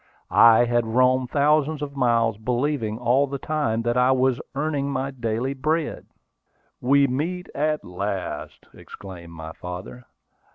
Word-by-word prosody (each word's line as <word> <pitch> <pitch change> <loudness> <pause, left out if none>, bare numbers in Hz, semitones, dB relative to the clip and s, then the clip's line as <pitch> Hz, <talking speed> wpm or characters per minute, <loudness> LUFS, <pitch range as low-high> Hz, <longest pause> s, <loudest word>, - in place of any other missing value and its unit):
I 115 +1 +7
had 120 -1 +1
roamed 125 +2 +2
thousands 150 +1 +2
of 140 -1 -6
miles, 115 -4 +1
believing 120 -1 -1
all 125 +4 +2
the 140 0 -4
time 130 -6 -1
that 120 +1 0
I 125 +1 +4
was 130 -1 +2
earning 140 -1 -1
my 135 0 -2
daily 120 +1 -2
bread. 155 +4 -2 0.7
"We 140 +2 +4
meet 165 +8 -3
at 150 +1 -1
last!" 90 -4 -5
exclaimed 85 -4 -11
my 80 -1 -8
father. 90 +8 -8
125 Hz, 135 wpm, -24 LUFS, 115-140 Hz, 0.7 s, I